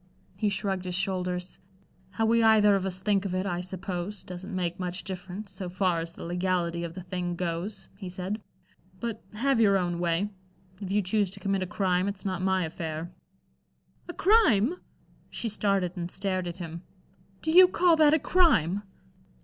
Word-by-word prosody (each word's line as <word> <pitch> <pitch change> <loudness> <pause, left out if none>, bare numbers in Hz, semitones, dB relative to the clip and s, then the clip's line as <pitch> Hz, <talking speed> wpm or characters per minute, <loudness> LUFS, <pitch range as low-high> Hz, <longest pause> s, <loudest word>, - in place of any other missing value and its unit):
He 215 - +1
shrugged 190 -2 -2
his 180 -1 -2
shoulders. 180 -1 -2 0.5
"How 215 +4 -1
we 230 +1 +4
either 215 -2 +6
of 195 -1 +1
us 185 0 -4
think 200 -2 +2
of 190 -2 -2
it, 185 +1 -1
I 175 -2 -1
suppose, 185 +1 -5
doesn't 185 +2 -7
make 180 0 -2
much 180 0 -3
difference 190 +2 -7
so 185 -1 -6
far 180 -2 +1
as 165 +1 -5
the - - -9
legality 175 -1 -1
of 170 -1 -6
the 185 - -7
thing 180 -1 -3
goes," 180 +3 -4
he 190 -3 -6
said. 185 +4 -4 0.6
"But, 230 0 -4
have 265 +2 +2
your 200 -3 +5
own 175 -2 -1
way. 175 +4 0 0.5
If 195 - -5
you 205 +1 +2
choose 200 +1 +1
to 190 - -8
commit 195 -1 0
a 185 - -2
crime, 185 -1 +1
it's 200 -1 -5
not 185 -2 -2
my 190 -1 +2
affair." 160 +1 -5 1.0
"A 350 - -5
crime!" 355 - +4 0.5
She 235 - -2
started 195 -3 0
and 175 -1 -4
stared 185 -1 -1
at 175 +1 -5
him. 170 -2 -6 0.6
"Do 315 - +1
you 365 +2 +9
call 355 -1 +4
that 305 -1 +6
a - - +4
crime?" 285 - +3
190 Hz, 180 wpm, -28 LUFS, 180-205 Hz, 1.0 s, you